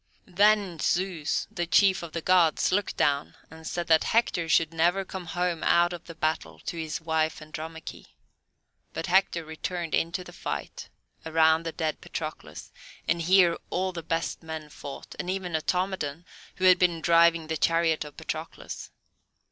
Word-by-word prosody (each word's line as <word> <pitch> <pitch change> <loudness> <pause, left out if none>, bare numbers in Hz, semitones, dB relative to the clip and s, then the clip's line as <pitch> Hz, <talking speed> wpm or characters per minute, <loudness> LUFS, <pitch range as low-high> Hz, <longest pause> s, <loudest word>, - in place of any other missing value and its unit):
Then 200 -2 +3
Zeus, 175 -4 0
the 175 -1 -3
chief 190 +3 +4
of 170 -2 -7
the 165 0 -4
Gods, 175 -4 +3
looked 200 +1 0
down 140 0 +1 0.2
and 160 0 -10
said 175 -1 -3
that 160 -1 +4
Hector 180 -7 +1
should 165 0 +3
never 175 +4 +2
come 185 -1 -7
home 175 -1 -1
out 175 +1 +4
of 175 - -8
the 165 - -10
battle 160 0 -2
to - - -5
his 160 -2 -4
wife, 160 -1 0
Andromache. 160 +1 -8 0.9
But - - -3
Hector 185 -2 +2
returned 165 +1 -4
into 170 +3 0
the - - -12
fight - - -5 0.3
around 160 0 +3
the - - -2
dead 155 -1 -3
Patroclus, 155 - -7 0.4
and 170 - +1
here 175 0 +5
all 185 +1 -1
the 175 -2 -6
best 165 +1 -2
men 160 -2 -7
fought, 140 -1 -9
and 180 - -3
even 185 -2 -3
Automedon, 175 -2 -2 0.3
who 185 - -1
had 185 -1 +7
been 175 -2 +2
driving 170 0 +4
the 160 +1 -2
chariot 165 0 +2
of 150 -1 -12
Patroclus. - - -6
165 Hz, 165 wpm, -27 LUFS, 160-180 Hz, 0.9 s, had